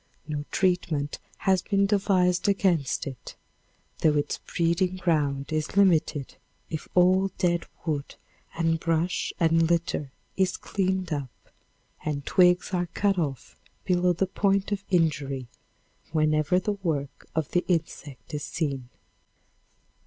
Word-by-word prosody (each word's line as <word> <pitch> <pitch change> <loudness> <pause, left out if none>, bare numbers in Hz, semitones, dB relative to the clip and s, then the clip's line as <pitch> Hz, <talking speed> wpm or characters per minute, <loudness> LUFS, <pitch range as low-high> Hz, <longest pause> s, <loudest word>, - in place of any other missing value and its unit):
No 145 -1 -3
treatment 175 -6 0 0.2
has 190 -2 +2
been 200 -1 +2
devised 190 -2 +2
against 180 -8 +1
it, 135 -3 -8 0.6
though 155 -2 +3
its 145 0 -1
breeding 170 +2 0
ground 150 -5 0
is 155 +4 -2
limited 165 -7 +2 0.3
if 160 - -4
all 185 +2 +5
dead 175 -1 +1 0.2
wood 145 -4 -2 0.4
and 165 -1 +1
brush 165 +2 0
and 165 -1 +3
litter 165 -5 0 0.2
is 190 -1 +1
cleaned 190 -3 -1
up 140 -3 -3 0.7
and 145 -2 -3
twigs 180 +1 +3
are 175 -1 0
cut 200 -2 +2
off 140 -6 -3 0.3
below 180 -1 +3
the 175 +3 +1
point 195 +1 +1
of 200 -1 -2
injury 145 -7 +1 0.7
whenever 155 +2 +2
the 210 +3 -1
work 145 -6 -3
of 160 -3 -1
the 175 - +2
insect 160 -4 -3
is 150 0 -3
seen. 140 -6 -3
170 Hz, 125 wpm, -26 LUFS, 150-185 Hz, 0.7 s, all